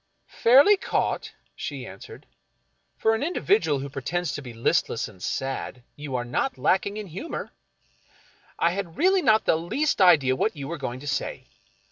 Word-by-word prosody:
" - - -47 0.2
Fairly 280 - +7
caught," - - -1 0.2
she - - -6
answered. - - -11 0.4
" - - -46
For 220 - +2
an 225 - -1
individual 360 - +1
who 135 +1 -5
pretends 150 +5 -3
to - - -4
be 125 -3 -9
listless 115 0 0
and 95 -4 -16
sad 135 0 -4
you 145 -3 -6
are 120 -1 -2
not 250 - -1
lacking 200 +2 +1
in 215 - -5
humor. 195 - -6 1.1
I 170 - +2
had 180 -3 -5
really 375 +3 +4
not 220 -7 +3
the - - +4
least 215 - -1
idea 150 -8 +5
what 195 +8 0
you 140 -2 -6
were 170 +1 -5
going 130 -1 -5
to 145 - -9
say. 135 - -3
170 Hz, 175 wpm, -25 LUFS, 135-225 Hz, 1.1 s, Fairly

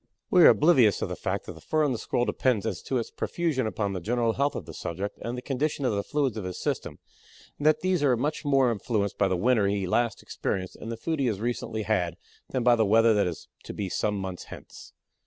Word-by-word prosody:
We 180 - +6
are - - +10
oblivious 135 - +4
of - - -2
the - - -3
fact - - -3
that - - -7
the 80 - -14
fur 155 - +1
on 145 - +2
the 120 - -2
Squirrel 120 - 0
depends 125 -6 0
as 110 - -3
to 130 - -2
its 115 - -3
profusion 155 -9 -1
upon 105 -2 -2
the 95 - -3
general 115 +4 0
health 140 +3 0
of 90 - -5
the 80 - -9
subject 95 +7 -5
and 120 +1 -4
the 125 - -6
condition 140 +1 -1
of 120 - +1
the 100 - 0
fluids 135 -1 -1
of 105 - -4
his 90 -1 -5
system, - - -3 0.6
and 145 - +1
that 155 0 +4
these 185 -2 +1
are 130 -4 +3
much 145 +7 -2
more 135 -4 +3
influenced 105 -1 -2
by 100 - +4
the 95 - 0
winter 110 +1 +3
he 100 -1 0
last 115 +4 0
experienced 95 -1 -3
and 115 - -7
the 115 - -4
food 160 +6 -2
he 135 - +2
has 105 -5 -1
recently 115 -1 -3
had 90 -6 0 0.3
than 130 - -1
by 120 0 +6
the 115 - +2
weather 115 +2 +5
that 105 -3 +2
is 85 -3 -6 0.2
to - - -7
be 100 -2 -3
some 105 +3 -1
months 95 -2 -5
hence. - - -12
115 Hz, 250 wpm, -27 LUFS, 100-135 Hz, 0.6 s, are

